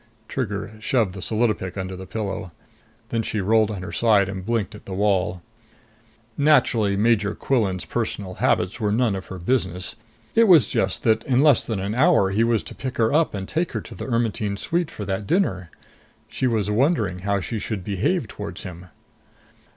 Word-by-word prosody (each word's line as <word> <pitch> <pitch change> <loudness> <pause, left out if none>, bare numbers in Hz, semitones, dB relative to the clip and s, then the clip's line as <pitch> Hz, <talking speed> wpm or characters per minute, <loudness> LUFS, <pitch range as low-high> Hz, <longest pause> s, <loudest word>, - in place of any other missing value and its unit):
Trigger 105 -6 -3
shoved 110 -4 +1
the 95 - -8
solidopic 110 -5 -1
under 95 0 -4
the 95 +1 -9
pillow. 100 -4 -4 0.6
Then 115 - 0
she 110 -1 -2
rolled 110 +2 +3
on 100 -4 -5
her - - -6
side 105 -4 +3
and 95 -1 -5
blinked 115 -2 -1
at 105 - -12
the 95 - -5
wall. 95 -3 +1 0.9
Naturally, 120 -9 +3
Major 105 -1 +2
Quillan's 95 -9 0
personal 100 -1 -3
habits 95 +7 +1
were 105 -2 0
none 115 -2 +2
of 95 - -6
her 95 - -7
business. 90 -1 0 0.4
It 230 0 +5
was 160 - +7
just 95 0 -1
that 110 -1 +3
in 130 +1 +3
less 150 -5 +4
than 110 -4 -2
an 100 +2 -2
hour 130 - +4
he 105 +3 +2
was 115 -2 +1
to - - -9
pick 130 -1 -5
her 110 -1 +2
up 160 -6 +2
and 95 -1 -5
take 170 +2 -1
her - - -2
to - - -11
the - - -7
Ermetyne 110 -4 -1
suite 170 - -1
for 105 - -7
that 95 +1 -3
dinner. 95 - 0 0.6
She 130 - -1
was 110 -4 0
wondering 110 - +1
how 100 +2 0
she 110 +3 -4
should 105 -3 -4
behave 100 -1 0
towards - - -7
him. 90 0 -9
105 Hz, 190 wpm, -23 LUFS, 95-120 Hz, 0.9 s, was